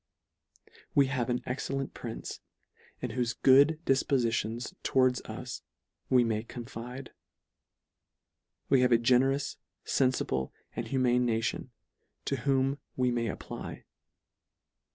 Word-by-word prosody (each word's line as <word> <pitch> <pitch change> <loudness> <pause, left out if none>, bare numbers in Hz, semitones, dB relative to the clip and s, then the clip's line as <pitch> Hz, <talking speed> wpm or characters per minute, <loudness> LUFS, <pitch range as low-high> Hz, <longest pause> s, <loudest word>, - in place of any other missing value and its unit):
We 140 - +6
have 125 -2 -1
an 125 0 0
excellent 135 +1 -3
prince, 115 -2 -6 0.6
in - - -3
whofe 120 -2 -2
good 140 +4 +6
difpoiitions 120 - +1
towards 130 -1 +3
us - - -6 0.5
we 125 -2 +5
may 110 -2 0
confide. 120 +2 -8 1.6
We 135 -2 +4
have 125 0 +3
a 115 - +7
generous, 130 +4 +2 0.3
fenlible, 125 - +1 0.2
and - - -3
humane 125 -2 +2
nation, 115 +2 -1 0.6
to - - 0
whom 135 0 +1 0.2
we 125 -1 +2
may 120 -1 0
apply. - - -6
125 Hz, 110 wpm, -30 LUFS, 120-135 Hz, 1.6 s, a